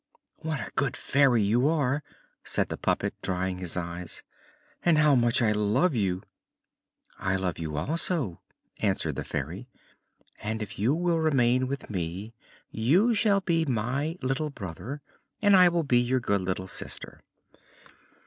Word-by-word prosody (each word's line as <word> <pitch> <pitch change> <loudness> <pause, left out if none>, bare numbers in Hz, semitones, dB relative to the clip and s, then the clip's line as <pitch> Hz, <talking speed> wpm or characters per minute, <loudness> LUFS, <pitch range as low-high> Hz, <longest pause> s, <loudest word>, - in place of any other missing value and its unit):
"What 160 -2 -3
a - - -6
good 140 -1 -1
Fairy 130 -5 +3
you 120 +7 +3
are," 145 -3 +1 0.4
said - - 0
the - - -3
puppet, - - 0
drying 95 0 -2
his 90 -2 -3
eyes, 85 0 -5 0.6
"and 170 -3 +4
how 150 -1 +5
much 120 -1 +3
I 110 - +3
love 105 - +2
you!" 95 -5 0 1.0
"I 95 0 0
love 95 -3 -2
you 75 -2 -4
also," 150 - -1 0.4
answered - - 0
the - - -3
Fairy; 85 - -5 0.7
"and 110 +1 -2
if 105 -1 -9
you 120 +8 +2
will 170 -1 +1
remain 130 -5 +3
with 140 -3 -5
me 95 +4 -4 0.4
you 175 - +3
shall 200 -2 +3
be 165 -3 +1
my 135 +5 -1
little 135 +4 0
brother 125 - -7 0.4
and 205 -2 +5
I 180 -1 +8
will 170 -1 0
be 125 -4 +3
your 125 +2 +1
good 100 -4 0
little 95 0 -3
sister." - - -5
125 Hz, 150 wpm, -27 LUFS, 95-155 Hz, 1.0 s, I